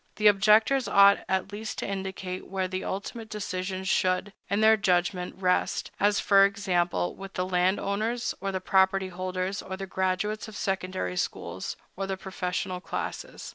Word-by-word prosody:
The 215 - -3
objectors 215 +6 +5
ought 200 0 +6
at 190 +1 0
least 215 +2 -5
to - - -3
indicate 190 -1 -5
where 190 0 -2
the 185 0 -4
ultimate 220 +3 -5
decision 185 -2 -4
should, 190 +1 +1 0.2
in 200 +2 +1
their 220 0 +7
judgment, 180 -2 0
rest—as, 195 +2 +1
for 195 -1 +6
example, 180 - +1
with 195 0 -9
the 180 - 0
landowners, 200 +6 0
or 195 0 -1
the 190 - -2
property 190 0 +2
holders, 185 +1 -3
or 190 0 -6
the 195 - -5
graduates 190 +3 -1
of 215 -1 -9
secondary 185 - -2
schools, - - -3 0.2
or 195 +1 -3
the 195 -1 -2
professional 185 -1 -3
classes. - - -5
190 Hz, 155 wpm, -27 LUFS, 185-200 Hz, 0.2 s, their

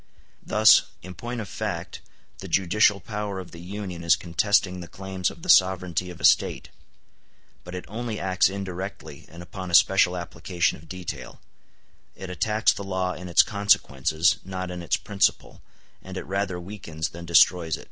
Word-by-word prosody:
*l - - -38 0.4
Thus, 110 0 +6 0.2
in 95 +1 -8
point 120 +7 -5
of 105 - -7
fact, - - -5 0.4
the - - -8
judicial 100 +2 +3
power 105 0 -5
of 90 - -9
the 85 - -11
Union 90 -2 -6
is 85 0 +5
contesting 90 +2 +1
the 85 - -8
claims 95 0 -3
of 165 - -13
the - - -8
sovereignty 90 - +3
of 90 -1 -10
a 75 - 0
State; - - +3 0.9
but 90 +1 -8
it 90 - -6
only 110 0 -5
acts 95 -1 +2
indirectly 95 0 -7
and 85 +1 -11
upon 95 +1 -8
a 85 - +2
special 90 0 +4
application 85 0 -2
of 80 - -18
detail: 90 -1 -7 0.8
it 95 -1 -8
attacks 105 +4 +2
the 100 - -7
law 95 -1 -2
in 90 0 -8
its 85 - +6
consequences, 85 -5 +2
not 95 -1 -5
in 90 -1 -6
its 85 - 0
principle, - - -1 0.4
and - - -9
it - - -4
rather 95 0 -2
weakens 85 -5 -6
than 85 +4 -10
destroys 85 -1 +4
it. - - -13
90 Hz, 175 wpm, -25 LUFS, 85-100 Hz, 0.9 s, Thus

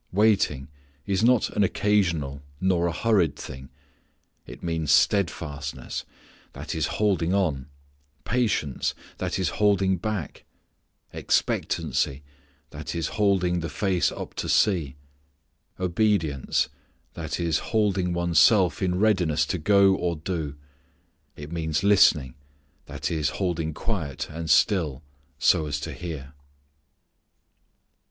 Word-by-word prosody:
Waiting 95 -10 +2 0.4
is 100 +1 0
not 125 -1 +3
an 105 - +1
occasional 85 -9 0 0.2
nor 90 -2 +2
a - - 0
hurried 95 -6 +1
thing. 65 -1 -9 0.8
It - - -11
means 80 -3 -2
steadfastness, 75 -6 0 0.5
that - - -6
is 80 -2 0
holding 95 -4 +1
on; 75 -9 0 0.6
patience, 110 - 0 0.2
that - - -2
is 95 -4 0
holding 100 -2 +2
back; 100 -3 -4 0.7
expectancy, 70 +1 -1 0.5
that - - -6
is 85 - -2
holding 95 -4 +1
the 85 -1 -4
face 95 +2 0
up - - -7
to - - -3
see; 85 -11 +2 0.8
obedience, 90 - +1 0.4
that 80 -1 -4
is 85 -2 +1
holding 100 -5 0
one's 85 -2 +1
self 95 0 +4
in 90 -2 +1
readiness 90 -7 +2
to 90 - -3
go 100 +3 +5
or 90 -2 -1
do; 80 -3 -4 0.8
it 75 +1 -9
means 80 -1 -1
listening, 90 -10 +4 0.5
that - - -4
is 75 -5 0
holding 85 -4 -1
quiet 80 - -4
and 80 0 -5
still 75 - +2 0.3
so 80 - +3
as 75 0 -2
to - - -5
hear. 75 -5 -7
85 Hz, 115 wpm, -25 LUFS, 75-100 Hz, 0.8 s, go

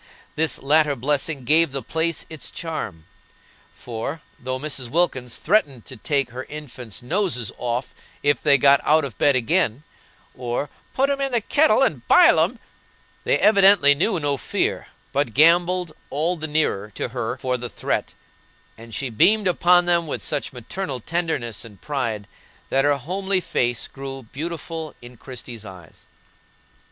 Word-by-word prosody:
This 160 -2 +1
latter 150 0 +3
blessing 140 +2 -1
gave 160 +3 +4
the 135 -1 -4
place 165 0 -1
its 160 -2 -7
charm, 105 - -6 0.7
for, 125 +7 -6 0.2
though 130 +1 -3
Mrs. 130 -3 -3
Wilkins 130 -6 0
threatened 150 - +1
to 130 - -8
take 135 +1 -1
her 130 +2 -6
infants' 125 -7 -8
noses 155 - -1
off 125 +1 -3 0.3
if 145 0 +2
they 140 - +5
got 140 0 +5
out 155 0 +3
of 125 -7 -7
bed 145 -2 +4
again, 130 0 +1 0.5
or 125 +3 -3 0.2
"put 275 +2 +2
'em 280 0 -2
in 275 -1 -1
the 240 - +4
kettle 300 +8 +3
and - - -1
bile - - +7
'em" - - +1 0.7
they - - +3
evidently 195 -8 +6
knew 175 +6 +1
no 145 -2 0
fear, - - -2 0.3
but 140 -6 0
gambolled 175 +3 +4 0.2
all 160 +6 +1
the 155 -2 -5
nearer 150 -10 0
to - - -3
her 115 -2 -3
for 130 -1 -1
the 120 -1 -4
threat; - - -3 0.6
and 115 -1 -9
she 130 +2 -3
beamed 205 - +4
upon 175 0 +4
them 170 -1 +2
with - - -4
such 145 -2 -2
maternal 135 +3 -5
tenderness 125 -8 -2
and 105 -5 -13
pride 115 -8 -3 0.4
that 135 +1 +3
her 145 -1 +3
homely 190 +7 -1
face 120 -8 -1
grew 135 -1 -8
beautiful 160 +4 -6
in 120 +1 -13
Christie's 120 -2 -8
eyes. 95 -5 -13
140 Hz, 155 wpm, -22 LUFS, 125-165 Hz, 0.7 s, bile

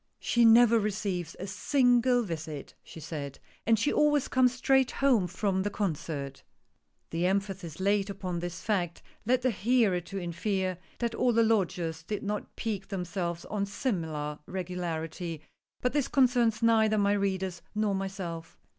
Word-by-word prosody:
"She 235 -1 +2
never 230 0 +7
receives 200 -4 -2
a 190 - -5
single 245 +4 +3
visit," 160 -6 -6
she - - -11
said, 145 -3 -6 0.3
"and 225 -1 +5
she 290 +7 +1
always 295 -2 +3
comes 255 -1 +3
straight 265 +1 +3
home 250 -9 +2
from 190 +1 -1
the 205 - -1
concert.". 150 -8 -3 0.7
The 170 +2 +1
emphasis 190 -4 -2
laid 200 +1 +1
upon 185 -3 -4
this 175 0 -5
fact 180 -6 -1 0.2
led 255 0 +2
the 255 - +3
hearer 215 -3 +2
to 195 +3 -7
infer 185 +1 -2 0.2
that 235 -1 -1
all 245 +1 +2
the 230 0 +4
lodgers 180 -7 0
did 205 +5 -4
not 210 0 -4
pique 205 -4 -3
themselves 180 -3 -3
on 200 -1 -2
similar 160 - -3
regularity 170 -3 -4 0.2
— - - -47
but 250 - +1
this 290 -3 +1
concerns 240 -4 +3
neither 220 -1 +4
my 200 0 +3
readers 190 -3 -1
nor 210 -1 +1
myself. 190 -4 -5
195 Hz, 155 wpm, -29 LUFS, 175-225 Hz, 0.7 s, never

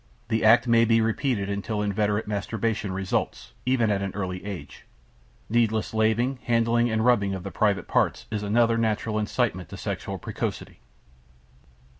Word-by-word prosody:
The 110 -1 0
act 115 +3 +6
may 115 -1 +5
be 115 0 +4
repeated 115 -1 0
until 100 +1 -2
inveterate 105 +1 0
masturbation 105 0 -2
results, 95 -9 -3
even 120 -4 +2
at 100 -1 0
an 100 -1 -4
early 90 -2 -4
age. 95 -9 -8 0.6
Needless 110 -1 +1
laving, 110 +4 +1
handling 120 0 +2
and 110 0 0
rubbing 100 -6 +3
of 95 - -7
the 100 - -6
private 100 +2 +1
parts - - +1
is 105 -1 -2
another 115 +2 +2
natural 110 -1 0
incitement 105 -5 -1
to - - -8
sexual - - -4
precocity. - - -5
110 Hz, 150 wpm, -25 LUFS, 100-115 Hz, 0.6 s, act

